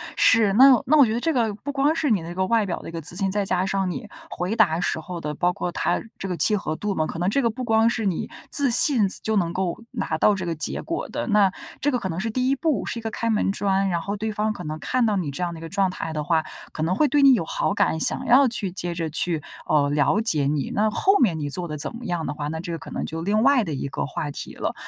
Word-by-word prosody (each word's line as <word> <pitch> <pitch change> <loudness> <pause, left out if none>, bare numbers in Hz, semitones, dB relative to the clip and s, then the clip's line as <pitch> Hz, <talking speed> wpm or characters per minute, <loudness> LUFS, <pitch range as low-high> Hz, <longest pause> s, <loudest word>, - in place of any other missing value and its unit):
是， 220 -4 +4
那 260 +3 +7
那 305 +4 +4
我 285 - +7
觉 220 - -1
得 235 - -1
这 325 +5 0
个， 225 -5 +1
不 285 +7 -6
光 285 +2 +2
是 305 -4 0
你 200 -6 +2
的 165 - -8
那 175 - -7
个 190 0 0
外 225 0 +2
表 180 - -3
的 - - -9
一 - - -8
个 165 0 -5
自 165 +3 -2
信， 195 0 0
再 205 0 -1
加 185 -1 0
上 195 -1 -1
你 175 - -6 0.2
回 180 +5 -3
答 175 -8 +3
时 175 -2 -1
候 170 +2 -7
的， 150 0 -4
包 175 +4 +1
括 175 - -4
它 - - -1 0.2
这 195 - -4
个 180 -2 -3
契 215 - +3
合 155 -6 -3
度 205 +4 -3
嘛。 155 - 0
可 - - -6
能 180 +2 +1
这 275 +7 +1
个 235 - +2
不 255 +3 -6
光 225 -1 +3
是 225 -2 -2
你 185 -4 -2 0.2
自 280 -2 +4
信， 235 -4 +6
自 190 - +1
就 220 - 0
能 175 -4 0
够 185 +4 -3
拿 160 - -3
到 205 +5 +3
这 185 -2 -4
个 170 - -2
结 155 - -2
果 335 - -4
的， - - -4
那 205 -4 +4 0.3
这 290 - +1
个 250 - +1
可 190 - -4
能 165 - -4
是 220 +4 -2
第 255 +3 0
1 275 - +2
步， 305 0 -1
是 235 - -4
一 - - -9
个 225 - -3
开 230 +2 -2
门 210 -3 +1
砖。 195 -1 0
然 170 -2 -1
后 200 +4 -4
对 215 +1 -3
方 215 0 -1
可 190 - -8
能 155 -1 -5
看 250 +6 0
到 215 -2 +1
你 160 -7 -2
这 140 - -6
样 175 - -2
的 165 - -9
一 - - -13
个 165 - -7
状 195 +2 +1
态 165 -3 -5
的 150 -1 -3
话， 160 0 +1 0.3
可 155 - -4
能 175 +3 0
会 300 - +3
对 290 +1 +2
你 275 -1 +7
有 200 -9 0
好 - - -1
感， 160 - +1
想 - - +1
要 265 +3 +5
去 210 -6 -3
接 175 -1 -4
着 165 -2 -3
去， 160 +1 -1 0.2
呃， 145 -2 +2
了 145 +8 +2
解 155 -11 +1
你。 145 -2 -1
那 215 +1 +2
后 390 - +3
面 185 -11 +2
你 145 -1 -3
做 175 +4 -3
得 150 -1 -5
怎 150 - -5
么 235 +1 -9
样 175 -3 -2
的 145 - -3
话， 145 -1 -5
那 160 +1 -4
这 170 0 -6
个 165 - -3
可 160 - -11
能 - - -3
就 165 +1 -5
另 205 +4 +1
外 275 -3 +4
的 165 -6 -4
一 140 0 -3
个 150 - -3
话 150 +1 -4
题 - - -7
了。 - - -3
195 Hz, 330 characters per minute, -23 LUFS, 165-230 Hz, 0.3 s, 那